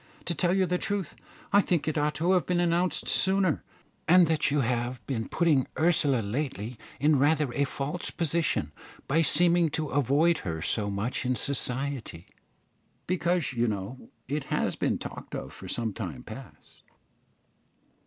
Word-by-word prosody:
To 175 - -1
tell 175 +3 +1
you 190 -1 +3
the 180 0 -1
truth, 200 -6 -3 0.4
I 205 - +7
think 175 -6 -1
it 155 - 0
ought 150 0 0
to 170 +3 +1
have 185 -2 +2
been 180 -1 +1
announced 175 +1 +1
sooner, 190 -4 +2 0.4
and 180 +2 +7
that 160 -2 +1
you 145 0 +1
have 120 +1 -2
been 115 -5 -3
putting 155 -7 +2
Ursula 155 -6 +3
lately 115 -1 -4 0.2
in 150 -1 +3
rather 145 -2 +2
a 140 +2 +1
false 145 +5 -3
position, 165 0 -1 0.4
by 160 +4 +3
seeming 170 +1 +4
to 155 0 -2
avoid 145 +5 +2
her 80 -3 -4
so 105 +5 +4
much 100 +7 -2
in 125 0 0
society, 130 -9 -3 0.8
because, 175 -4 0
you 120 0 +1
know, 105 +4 -5 0.2
it 145 +1 -3
has - - -1
been - - 0
talked - - -8
of - - -6
for - - -10
some 115 -3 -2
time 90 - -6
past." - - -12
145 Hz, 160 wpm, -28 LUFS, 125-170 Hz, 0.8 s, I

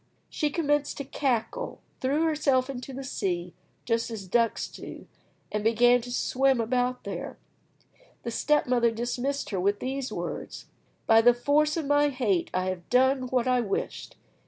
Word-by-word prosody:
She 300 - 0
commenced 295 -2 0
to 280 - -3
cackle, 255 -5 -2 0.2
threw 280 +5 +1
herself 280 -5 +2
into 255 0 -7
the 270 +1 -6
sea, 180 -8 -3 0.3
just 230 0 0
as 220 -4 -6
ducks 230 +4 +1
do, - - -10 0.5
and 210 0 -2
began 240 +2 +4
to 245 +1 -8
swim 265 +1 +2
about 250 +2 0
there. - - -6 0.9
The 235 - -3
step 300 +5 +2
mother 240 -2 +3
dismissed 245 +5 -2
her 190 - -1
with 200 +3 +1
these 265 +1 -3
words: - - -5 0.4
"By 225 -1 +6
the 240 +1 +6
force 300 +5 +2
of 320 - -2
my 290 +1 +3
hate, 225 -10 0
I 185 0 -1
have 180 -2 -6
done 260 +1 +3
what 250 0 0
I 250 -1 +3
wished! 200 -4 -4
250 Hz, 160 wpm, -27 LUFS, 230-275 Hz, 0.9 s, By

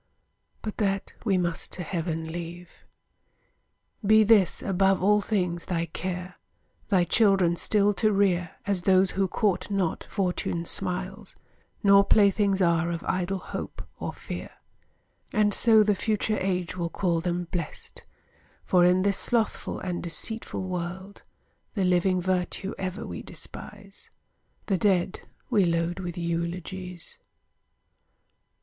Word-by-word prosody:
But 215 - -5
that 195 -2 -1
we 195 -5 +2
must 175 -2 -2
to 180 - -2
heaven 165 -2 -3
leave. 175 +1 -8 1.2
Be 215 +2 +6
this, 210 -4 +4
above 195 0 +2
all 210 +1 +4
things, 180 -5 -1
thy 170 -3 -1
care, 180 +2 -5 0.5
Thy 185 -3 +3
children 195 -3 +3
still 205 +3 +3
to 215 - +4
rear, 185 -4 +1
As 200 -3 +1
those 185 0 +4
who 195 0 +1
court 190 -1 0
not 195 -5 -1
Fortune's 180 -3 -1
smiles, 190 0 -4 0.5
Nor 200 0 +7
playthings 200 -1 +3
are 170 0 +2
of 170 -1 -3
idle 185 +1 -1
hope, - - -6 0.2
or - - -3
fear: - - -7 0.8
And 210 -1 +3
so 220 0 +5
the 210 0 +3
future 215 +1 0
age 180 -2 -1
will 170 -2 -2
call 170 -2 0
them 175 0 -2
blessed; 170 -5 -5 0.6
For, 180 -1 +4
in 180 +1 +4
this 200 -1 +2
slothful 230 -3 -1
and 180 -1 -3
deceitful 190 +2 -3
world, 180 +2 -5 0.5
The 195 -3 +1
living 180 +1 +2
virtue 185 +2 -1
ever 190 +4 -4
we - - -6
despise, 200 -1 -9 0.6
The 195 -3 0
dead 190 -4 +1 0.3
we 210 -4 +4
load 170 +1 0
with 175 -2 -5
eulogies. 175 +1 -4
185 Hz, 130 wpm, -27 LUFS, 175-200 Hz, 1.2 s, Nor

